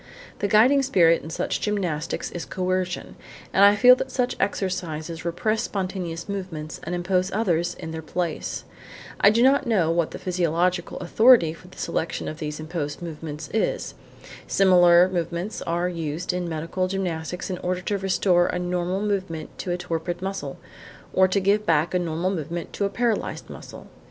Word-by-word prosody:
The 205 - 0
guiding 245 +7 +5
spirit 175 -11 +4
in 160 - -9
such - - -2
gymnastics 180 -7 -2
is 175 - -5
coercion, 185 +4 -2 0.4
and 195 - +5
I 205 +1 +8
feel 250 +4 +8
that 265 - -4
such 255 -1 -1
exercises 170 -5 -2
repress 215 +6 0
spontaneous 185 -4 -4
movements 185 -6 -5
and 175 +2 -3
impose 180 +1 0
others 175 -5 0
in 160 - -7
their 160 0 -5
place. 160 - -3 0.6
I - - +7
do 230 +3 +3
not 275 0 +4
know 185 -8 +2
what 170 -1 +1
the - - -7
psychological 180 0 0
authority 220 -2 +5
for 175 +2 -15
the 180 - -16
selection 165 - -2
of 155 - -6
these 150 -1 -4
imposed 155 -1 -4
movements 155 -2 -6
is. 220 - -1 0.5
Similar 180 -2 +6
movements 175 +2 -3
are 170 +1 0
used 170 0 -3
in 180 -1 -2
medical 165 +3 -2
gymnastics 180 -1 -3
in 180 - -4
order 180 0 -2
to 200 +2 -2
restore 185 -2 +2
a - - -2
normal 180 +1 -1
movement 185 -6 -3
to - - -4
a 175 - 0
torpid 175 0 -3
muscle 190 -7 -4 0.6
or 190 0 +5
to 185 +2 +1
give 200 +2 +2
back 165 +1 +2
a 180 - +2
normal 170 +2 -1
movement 170 -1 -4
to 200 - -1
a - - 0
paralysed 230 +1 -2
muscle. - - -10
180 Hz, 170 wpm, -24 LUFS, 165-195 Hz, 0.6 s, I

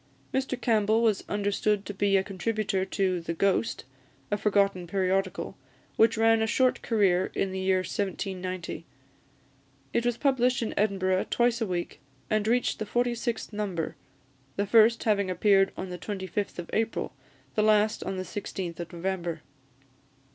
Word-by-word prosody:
Mr 265 -1 -1
Campbell 220 0 +2
was 215 -4 +2
understood 205 0 0
to 205 - -5
be 195 0 +2
a 190 - +2
contributor 195 0 -1
to 190 -2 0
The 170 0 -4
Ghost, 175 - +1 0.5
a - - +3
forgotten 195 -4 +2
periodical, 190 +1 -1 0.4
which 225 0 +4
ran 225 0 +4
a 220 - +1
short 255 +3 +2
career 190 -5 +2
in 195 - 0
the 190 - -3
year 190 0 +2
1790. 185 -1 -4 1.1
It 235 - +2
was 240 -1 0
published 255 -3 +2
in 225 - -3
Edinburgh 190 -2 +1
twice 240 0 +2
a 225 - 0
week, 175 -2 -3 0.3
and 215 0 +1
reached 245 +2 +1
the 215 - -2
forty 240 +2 +1
sixth 235 -1 -3
number; 195 -6 -3 0.6
the 200 - 0
first 225 +2 +5
having 200 -3 +2
appeared 195 +1 +3
on 185 - -5
the 180 0 -6
25th 200 0 -4
of 175 -1 -6
April, 225 +1 -1 0.4
the - - +1
last 215 0 +3
on 190 0 -3
the 185 - -2
16th 185 -2 -5
of 170 -2 -6
November. 175 -2 -3
200 Hz, 155 wpm, -28 LUFS, 185-220 Hz, 1.1 s, first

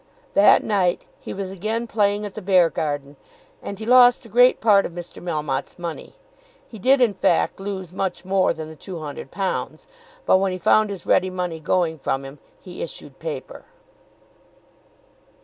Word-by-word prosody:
That 200 - +6
night 190 -4 0
he - - -8
was 190 -1 -5
again 215 +5 -3
playing 205 -2 0
at 205 - -7
the 215 - -7
Beargarden, 155 -7 +1 0.4
and 200 - -6
he 220 - -7
lost 245 +1 +6
a - - -13
great 245 +4 +5
part 205 -3 +5
of - - -6
Mr. 175 0 -8
Melmotte's 150 -5 -3
money. 170 -2 -7 0.5
He 220 - -11
did 260 +6 +4
in 235 -4 +4
fact 195 - +1
lose 190 -3 -6
much 190 -1 -3
more 190 0 +2
than 155 -1 -6
the 160 - -11
£200; 165 +2 -5 0.4
but - - +5
when 190 -1 0
he - - -3
found 215 +4 +3
his 195 -4 -7
ready 185 0 +3
money 180 -3 -4
going 160 0 0
from 135 0 -2
him 135 +1 -11 0.2
he 180 -2 -9
issued 145 -4 -7
paper. 155 -5 -7
185 Hz, 165 wpm, -22 LUFS, 160-205 Hz, 0.5 s, That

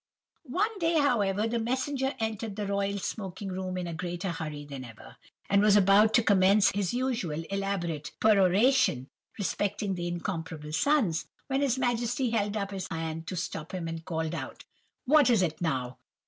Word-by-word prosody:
"One 410 - 0
day, 330 -1 +2
however, 215 -7 +2
the 235 +1 -1
messenger 265 +3 -1
entered 220 -1 -3
the 210 -1 -3
royal 200 0 -1
smoking 195 -1 -5
room 185 0 -4
in 180 - -3
a 170 - -4
greater 175 +2 -3
hurry 155 -3 -5
than 140 -2 -7
ever, 110 - -13 0.3
and 200 0 +4
was 210 -1 +5
about 205 +2 +5
to 240 - +5
commence 200 0 +5
his 200 -2 -1
usual 240 -11 -2
elaborate 175 -7 -2
peroration 200 - +3 0.3
respecting 205 0 -1
the 175 -1 -3
incomparable 165 -3 -4
sons, 215 - +2 0.2
when 270 0 -1
his 265 -3 +1
Majesty 245 0 0
held 210 -2 0
up 200 -1 -3
his 190 -2 -4
hand 160 0 -4
to - - -4
stop 165 -1 -5
him, 175 -3 -4
and 165 0 -5
called 160 -1 -3
out:— 165 - -6 0.4
"'What 290 0 +5
is 225 -6 +4
it 165 -1 -2
now? 130 -6 -2
195 Hz, 170 wpm, -29 LUFS, 170-230 Hz, 0.4 s, was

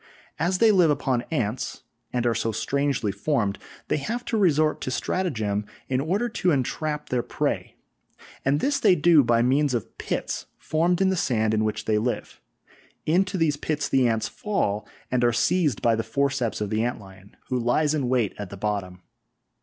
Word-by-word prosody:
As 180 +3 +1
they 225 +2 +5
live 180 -5 +5
upon 135 -4 0
ants 120 -6 -2 0.3
and 125 -1 -1
are 120 - +3
so 115 0 -1
strangely 140 -3 0
formed, 105 -1 -1 0.3
they - - +1
have 235 - -3
to - - -2
resort 155 -7 +2
to - - -3
stratagem 115 - -1 0.3
in 130 0 +1
order 195 +11 0
to 200 -5 0
entrap 150 +1 -1
their 125 -1 +1
prey, - - -2 0.7
and 140 +2 +1
this 280 0 +1
they 200 -8 +5
do 160 -2 +5
by 120 -1 +3
means 135 +1 +2
of 115 - -4
pits - - -3
formed 170 +3 +1
in 190 - +4
the 190 - +1
sand 110 -9 +1
in 110 0 +2
which 110 -1 -2
they 105 -1 +2
live; 120 +3 -3 0.6
into 185 +4 +2
these 155 -4 +1
pits 150 0 -2
the 130 -2 +3
ants 110 -1 0
fall, 110 - -2 0.2
and 125 -1 +1
are 120 - +4
seized 150 - +1
by 115 - +4
the 115 - 0
forceps 125 0 -1
of 105 - -2
the 110 +1 +1
ant 120 +1 -2
lion, 95 0 -15
who 125 - 0
lies 145 +6 +2
in 140 -5 0
wait 125 -5 +1
at 100 -3 -5
the 100 - -8
bottom. 95 -3 -3
130 Hz, 185 wpm, -25 LUFS, 110-160 Hz, 0.7 s, they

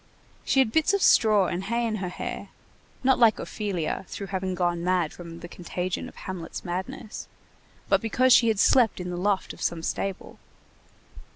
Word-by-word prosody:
She - - 0
had 235 -4 +1
bits 320 - +3
of 400 - -1
straw 210 -3 +5
and 180 +2 -3
hay 235 +3 0
in 220 -2 -1
her 185 -2 -3
hair, - - -6 0.5
not 265 0 +3
like 230 -2 +5
Ophelia 195 -6 -3
through 200 - -6
having 190 -1 -2
gone 175 -1 0
mad 180 -3 +1
from 170 -1 -10
the 175 - -7
contagion 180 +1 -4
of - - -18
Hamlet's 180 -3 -7
madness, 185 +5 -5 0.6
but - - +3
because 250 +3 +3
she 235 - +6
had 220 -2 +2
slept 230 +1 +4
in 180 0 -4
the - - -3
loft 195 +2 0
of - - -14
some 165 -1 -2
stable. 195 +2 -4
190 Hz, 180 wpm, -26 LUFS, 175-225 Hz, 0.6 s, she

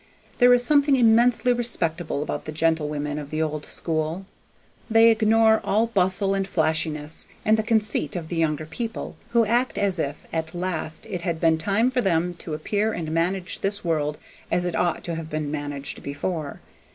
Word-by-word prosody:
There 245 -1 +7
is 245 0 +5
something 285 0 +4
immensely 240 +1 +4
respectable 175 -11 -2
about - - -4
the 155 - -5
gentlewomen 150 -2 -1
of 145 -1 -8
the 155 - -3
old 155 -2 -2
school. 160 +3 -3 0.6
They 225 +1 +6
ignore 220 0 +4
all 220 +3 +2
bustle 195 -2 +1
and 195 -1 -1
flashiness, 155 -3 0 0.2
and 215 - +5
the 220 - +1
conceit 215 -2 +1
of 170 -3 -4
the 175 - -4
younger 155 -2 0
people, 225 +9 -5
who 235 -1 +3
act 240 +4 +1
as 195 -3 +1
if 145 -1 -3
at 160 0 -3
last 175 -3 -4
it 185 -6 -5
had 170 -2 -2
been 160 -1 +3
time 205 +9 +1
for 255 -1 +1
them 175 -3 +1
to 155 - -5
appear 205 +7 -1
and 160 -4 -4
manage 180 +3 -1
this 200 -1 -2
world 150 -3 0 0.3
as 175 - 0
it 175 - -2
ought 175 -1 0
to 170 - -4
have 165 -1 -5
been 155 -1 -3
managed 145 -2 -5
before. 145 +1 -4
175 Hz, 180 wpm, -24 LUFS, 155-220 Hz, 0.6 s, There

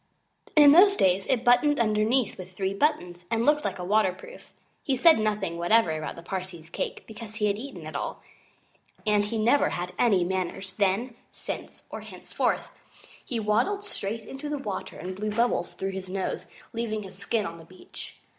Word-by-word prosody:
In 295 -2 +9
those 395 +6 +7
days 190 +1 +3
it 250 -3 +1
buttoned 285 +4 +4
underneath 220 +2 +2
with 185 0 -10
three 190 +1 -1
buttons 180 - 0
and 230 0 +1
looked 295 0 +4
like - - -2
a 180 - -5
waterproof. 210 - -1 0.3
He 270 - 0
said 320 +1 +6
nothing 205 -6 -1
whatever 195 +1 +4
about 155 0 -4
the 170 - -10
Parsee's 180 -3 -6
cake, - - -4
because 220 0 -9
he 215 -1 0
had 200 -1 +2
eaten 275 +4 -8
it - - -8
all; - - -4 0.8
and 210 -1 +3
he 225 +2 -3
never 240 +6 +3
had 180 +1 -4
any 200 -7 +4
manners, 185 +1 -3
then, 200 +6 +1 0.2
since, - - -7
or - - -6
henceforward. - - -2 0.6
He 240 - -3
waddled 235 - +1
straight 220 - -4
into 275 +2 -7
the 295 - -1
water 210 -8 -5
and 185 +3 -6
blew 210 +2 -3
bubbles 220 -4 0
through 195 0 -3
his 190 -1 -6
nose, 190 0 -3 0.3
leaving 220 -2 -2
his 190 - -10
skin 205 +3 -1
on 170 -1 -6
the - - -12
beach. 185 +2 -11
210 Hz, 185 wpm, -27 LUFS, 185-240 Hz, 0.8 s, In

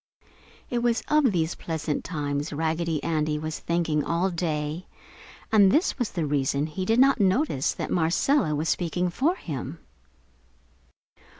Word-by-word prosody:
It 240 - +1
was 235 0 +1
of 300 -5 +4
these 165 -2 0
pleasant 160 -2 -3
times 145 -3 -3
Raggedy 160 +1 -1
Andy 155 -2 0
was 155 +1 -4
thinking 165 -3 0
all 175 +3 0
day, 160 0 -3 0.6
and 200 -3 +6
this 310 - +1
was 245 - 0
the 170 -5 -2
reason 140 0 0
he 175 +4 -4
did 225 +4 +2
not 270 0 +5
notice 195 - +1
that - - -4
Marcella 170 - +2
was 155 +2 -2
speaking 175 +1 0
for 310 - +1
him. 145 - -6
165 Hz, 140 wpm, -26 LUFS, 150-200 Hz, 0.6 s, and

